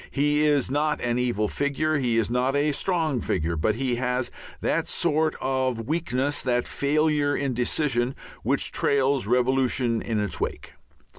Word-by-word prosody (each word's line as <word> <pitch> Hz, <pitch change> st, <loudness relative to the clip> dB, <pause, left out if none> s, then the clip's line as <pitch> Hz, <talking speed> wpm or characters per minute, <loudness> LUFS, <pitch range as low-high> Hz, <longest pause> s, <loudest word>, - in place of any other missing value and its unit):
He 150 Hz, +1 st, +2 dB
is 145 Hz, -4 st, +2 dB
not 150 Hz, +2 st, +1 dB
an 120 Hz, 0 st, 0 dB
evil 120 Hz, -4 st, 0 dB
figure, 145 Hz, +5 st, 0 dB
he 120 Hz, -3 st, +1 dB
is 115 Hz, 0 st, +1 dB
not 125 Hz, +3 st, +1 dB
a 145 Hz, +1 st, +2 dB
strong 160 Hz, -5 st, 0 dB
figure, 85 Hz, 0 st, -1 dB
but 95 Hz, +7 st, +1 dB
he 125 Hz, 0 st, -1 dB
has 125 Hz, 0 st, -1 dB, 0.3 s
that -, -, 0 dB
sort 155 Hz, -1 st, +1 dB
of 130 Hz, -3 st, -1 dB
weakness, 145 Hz, -2 st, -1 dB
that 125 Hz, -1 st, 0 dB
failure 150 Hz, 0 st, +1 dB
in 135 Hz, -2 st, -1 dB
decision, 125 Hz, 0 st, 0 dB, 0.3 s
which -, -, 0 dB
trails 135 Hz, -4 st, +1 dB
revolution 125 Hz, -1 st, +1 dB
in 110 Hz, -2 st, -2 dB
its 100 Hz, -6 st, -3 dB
wake. -, -, -4 dB
130 Hz, 155 wpm, -25 LUFS, 120-145 Hz, 0.3 s, He